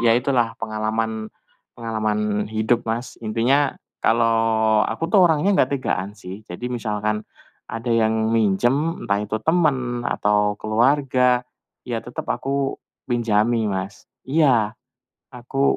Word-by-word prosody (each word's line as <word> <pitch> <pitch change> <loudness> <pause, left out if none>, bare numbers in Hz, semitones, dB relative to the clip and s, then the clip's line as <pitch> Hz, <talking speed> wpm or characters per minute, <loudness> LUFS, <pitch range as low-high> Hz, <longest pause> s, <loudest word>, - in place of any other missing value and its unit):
ya 115 -1 +4
itulah 125 -2 +1
pengalaman 110 0 -2 0.5
pengalaman 105 -2 -1
hidup 110 +2 0
Mas. 115 +3 -3
Intinya 125 +6 +2 0.3
kalau 115 -1 +3
aku 165 - -3
tuh 200 - +6
orangnya 160 +5 +2
nggak 135 +2 +2
tegaan 100 -4 -2
sih. 95 +1 -9
Jadi 115 +8 -6
misalkan 105 -2 -2 0.5
ada 115 +2 -4
yang 110 -1 +2
minjem, 120 - +1
entah 100 0 +1
itu 105 +1 -2
temen 135 -8 +1
atau 105 0 +1
keluarga, 125 +2 +2 0.4
ya - - -2
tetep - - -7
aku 140 0 -1 0.3
pinjami 115 -1 +2
Mas. 95 0 -5 0.2
Iya 130 -7 +3 0.6
aku 135 +3 0
115 Hz, 120 wpm, -22 LUFS, 110-125 Hz, 0.6 s, tuh